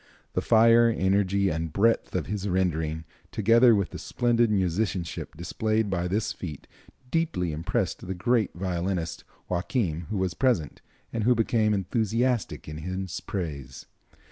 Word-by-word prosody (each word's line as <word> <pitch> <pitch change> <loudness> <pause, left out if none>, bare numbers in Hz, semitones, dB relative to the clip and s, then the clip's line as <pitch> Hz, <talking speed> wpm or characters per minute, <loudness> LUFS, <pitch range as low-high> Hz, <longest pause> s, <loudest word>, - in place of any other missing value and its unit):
The - - 0
fire, 115 +1 +5
energy 100 -1 +2
and 80 -1 -2
breadth 115 +7 +1
of - - 0
his 105 0 -3
rendering, 80 -4 -1 0.3
together 115 +3 +5
with 100 -4 -1
the - - -7
splendid 120 -1 +1
musicianship 95 -4 -1
displayed 110 +5 -1
by 90 -1 0
this 105 +4 -1
feat, 75 -7 -7 0.5
deeply 115 - 0
impressed 90 +4 -2
the 95 - -3
great 110 +3 +1
violinist 90 -1 -2 0.2
Joachim, 90 - -1
who 105 - -2
was 95 -2 0
present, 95 - 0 0.3
and 115 - -1
who 125 +3 +4
became 110 -1 +2
enthusiastic 110 +4 -1
in 75 0 -6
his 95 +2 -4
praise. 70 -9 -5
95 Hz, 140 wpm, -27 LUFS, 85-110 Hz, 0.5 s, fire